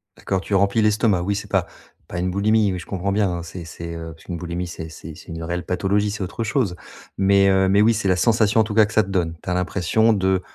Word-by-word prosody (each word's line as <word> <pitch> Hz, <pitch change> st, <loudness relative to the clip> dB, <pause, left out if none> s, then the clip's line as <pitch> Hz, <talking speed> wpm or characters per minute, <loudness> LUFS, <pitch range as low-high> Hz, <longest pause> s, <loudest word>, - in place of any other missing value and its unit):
D'accord, 95 Hz, -2 st, -2 dB
tu 100 Hz, -, -2 dB
remplis 100 Hz, +3 st, +3 dB
l'estomac. 105 Hz, -3 st, +2 dB
Oui, 100 Hz, +3 st, -1 dB
c'est 100 Hz, -, -6 dB
pas -, -, +1 dB, 0.4 s
pas 90 Hz, -, -5 dB
une 90 Hz, +1 st, -1 dB
boulimie, 105 Hz, +1 st, +2 dB
oui, 90 Hz, -, -3 dB
je -, -, -10 dB
comprends 95 Hz, 0 st, -3 dB
bien, 100 Hz, -1 st, +2 dB
hein, 85 Hz, -1 st, -4 dB
c'est 85 Hz, 0 st, -8 dB
c'est, 85 Hz, 0 st, -7 dB
heu, 80 Hz, -1 st, -7 dB
parce 80 Hz, -, -19 dB
qu'une 85 Hz, -2 st, -5 dB
boulimie 90 Hz, +1 st, -4 dB
c'est 80 Hz, -2 st, -7 dB
c'est 80 Hz, 0 st, -10 dB
c'est -, -, -14 dB
une 80 Hz, 0 st, -6 dB
réelle 85 Hz, +1 st, -3 dB
pathologie, 100 Hz, +3 st, 0 dB
c'est 105 Hz, -1 st, -4 dB
autre 110 Hz, +5 st, -4 dB
chose 105 Hz, -6 st, 0 dB, 0.4 s
mais, 100 Hz, 0 st, +4 dB
heu, 95 Hz, 0 st, +3 dB
mais 100 Hz, +2 st, +4 dB
oui 115 Hz, +2 st, +5 dB
c'est 105 Hz, -2 st, -2 dB
la 90 Hz, -, +3 dB
sensation, 110 Hz, +2 st, +3 dB
en -, -, +4 dB
tout 105 Hz, -1 st, -5 dB
cas, 110 Hz, 0 st, +6 dB
que 105 Hz, -, -8 dB
ça 110 Hz, -, +4 dB
te 95 Hz, -, -9 dB
donne. 85 Hz, -4 st, -1 dB
Tu -, -, -5 dB
as -, -, +1 dB
l'impression 95 Hz, +5 st, +2 dB
de 95 Hz, -2 st, +1 dB
95 Hz, 275 wpm, -22 LUFS, 90-105 Hz, 0.4 s, cas